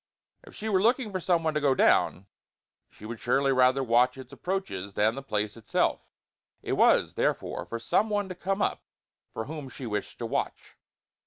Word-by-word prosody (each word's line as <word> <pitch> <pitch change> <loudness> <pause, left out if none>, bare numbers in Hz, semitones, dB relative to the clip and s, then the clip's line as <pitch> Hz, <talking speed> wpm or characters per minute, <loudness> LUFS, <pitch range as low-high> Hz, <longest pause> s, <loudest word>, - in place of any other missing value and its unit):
If - - -15
she 220 - -5
were 195 -3 +2
looking 230 0 +2
for 185 - -2
some 170 -2 +1
one 160 -1 0
to 150 - 0
go 140 -2 +3
down, 95 - +3 0.6
she 105 - -14
would 115 +1 -6
surely 135 +3 +2
rather 130 +1 +4
watch 125 +2 +3
its 130 - -11
approaches 140 - -4
than 110 +2 +3
the 135 - -6
place 105 -5 -2
itself. 115 -2 -1 0.5
It - - -2
was, - - +4
therefore, - - -1
for 115 - -4
some 200 - +1
one 205 -1 0
to 185 - -5
come 195 +3 -1
up - - -1 0.5
for 110 - -5
whom 150 -2 -7
she 130 - -8
wished 105 -3 -4
to - - -4
watch. - - -3
135 Hz, 190 wpm, -28 LUFS, 115-185 Hz, 0.6 s, rather